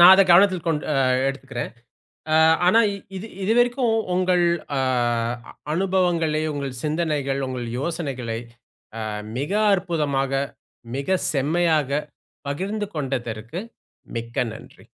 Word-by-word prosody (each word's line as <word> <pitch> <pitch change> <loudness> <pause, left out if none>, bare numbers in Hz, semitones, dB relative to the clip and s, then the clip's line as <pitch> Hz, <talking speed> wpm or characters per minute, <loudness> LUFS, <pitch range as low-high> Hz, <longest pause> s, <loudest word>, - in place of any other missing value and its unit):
நான் 180 +2 +11
அத 195 - +7
கவனத்தில் 185 -1 +5
கொண்டு 160 -2 0
அ - - +1 0.3
எடுத்துக்கிறேன். 135 -2 -5 0.6
அ - - +4 0.3
ஆனா 225 +6 +6 0.4
இது 190 +4 -6 0.2
இதுவரைக்கும் 240 +3 +3 0.2
உங்கள் 180 -1 +3 0.3
அ - - +1 0.9
அனுபவங்களை, 175 -4 +1
உங்கள் 140 -3 -4
சிந்தனைகள், 150 -3 -1
உங்கள் 125 -2 -4
யோசனைகளை 135 -7 -3 0.6
அ - - -3 0.4
மிக 145 +8 -2 0.2
அற்புதமா 155 -7 0 0.7
மிக 140 +7 +1 0.2
செம்மையாக 150 -1 +2 0.5
பகிர்ந்து 200 +8 -2
கொண்டதற்கு 125 - -3 0.6
மிக்க 115 0 -6 0.2
நன்றி. - - -14
155 Hz, 105 wpm, -23 LUFS, 135-185 Hz, 0.9 s, நான்